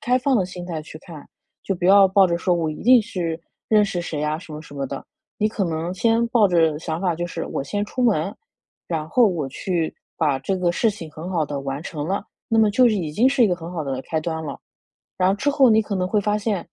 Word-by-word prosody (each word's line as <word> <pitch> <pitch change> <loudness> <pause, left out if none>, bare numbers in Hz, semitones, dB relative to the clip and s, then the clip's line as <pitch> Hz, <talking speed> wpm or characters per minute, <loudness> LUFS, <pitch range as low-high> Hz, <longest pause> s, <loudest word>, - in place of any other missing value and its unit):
开 250 +1 +2
放 260 0 +2
的 190 - +2
心 180 -1 -8
态 165 -3 -4
去 155 0 -11
看。 160 -3 -11 0.4
就 195 - -2
不 175 - -5
要 195 +1 +7
抱 190 0 +5
着 170 -1 0
说 180 +1 +1
“我 160 -2 0
一 155 - -8
定 250 +1 +7
是 170 -5 -4 0.3
认 210 -1 +5
识 195 -4 -2
谁 155 -3 -4
啊”， 150 +1 0
什 170 - -12
么 150 - -6
什 145 - -13
么 140 - -3
的。 135 +1 -6 0.3
你 215 - +2
可 215 -2 -3
能 165 +1 -3
先 230 +4 +2
抱 225 -4 +4
着 165 -4 +3
想 160 0 -3
法 180 -3 +1
就 175 +2 -3
是， 175 - -5
我 - - -3
先 205 +9 -2
出 250 +4 -3
门， 200 -5 +1 0.5
然 155 -2 -3
后 240 +7 +4
我 165 -8 -1
去 165 +3 -2 0.2
把 145 -4 +1
这 185 +8 -2
个 180 -1 +1
事 220 +6 +1
情 165 -6 -9
很 160 +4 -8
好 165 -4 +1
地 145 -1 -4
完 135 +2 -4
成 155 -3 -5
了， 195 +2 -2 0.2
那 225 - +1
么 215 -1 +5
就 245 +4 +5
是 220 - +1
已 170 -7 -2
经 225 +12 +3
是 270 -2 +2
一 - - +3
个 180 - 0
很 170 0 -8
好 170 -3 -3
的 135 -2 -3
开 160 +2 -2
端 160 0 -4
了。 150 - -6 0.6
然 185 - +2
后 195 - +3
之 270 +8 -1
后， 275 -3 +5
你 220 0 +5
可 210 -1 -4
能 185 -1 0
会 210 +2 +1
发 210 +1 0
现： 210 -1 -1
180 Hz, 285 characters per minute, -22 LUFS, 160-210 Hz, 0.6 s, 要